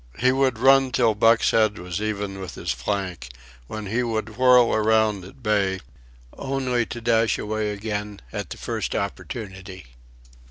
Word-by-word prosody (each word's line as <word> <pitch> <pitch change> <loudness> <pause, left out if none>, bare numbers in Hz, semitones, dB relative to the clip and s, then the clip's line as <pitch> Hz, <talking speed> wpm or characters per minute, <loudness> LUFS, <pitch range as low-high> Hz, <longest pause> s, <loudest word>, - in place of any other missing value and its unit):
He 130 +1 +3
would 130 -2 +1
run 135 +2 +5
till 115 -3 +3
Buck's 115 +2 +4
head 110 -2 +2
was 90 +3 -5
even 100 -2 -3
with 95 - -7
his - - -3
flank, 85 +1 -3 0.4
when 110 - -6
he 115 +5 -1
would 110 -2 -3
whirl 125 -1 +5
around 110 -2 +2
at 125 +8 -14
bay, 100 -3 +1 0.6
only 130 -3 -1
to 120 - -6
dash 115 -1 +2
away 110 0 -2
again 105 0 -4
at - - -4
the - - -7
first - - -3
opportunity. 95 -2 -6
110 Hz, 155 wpm, -24 LUFS, 100-120 Hz, 0.6 s, run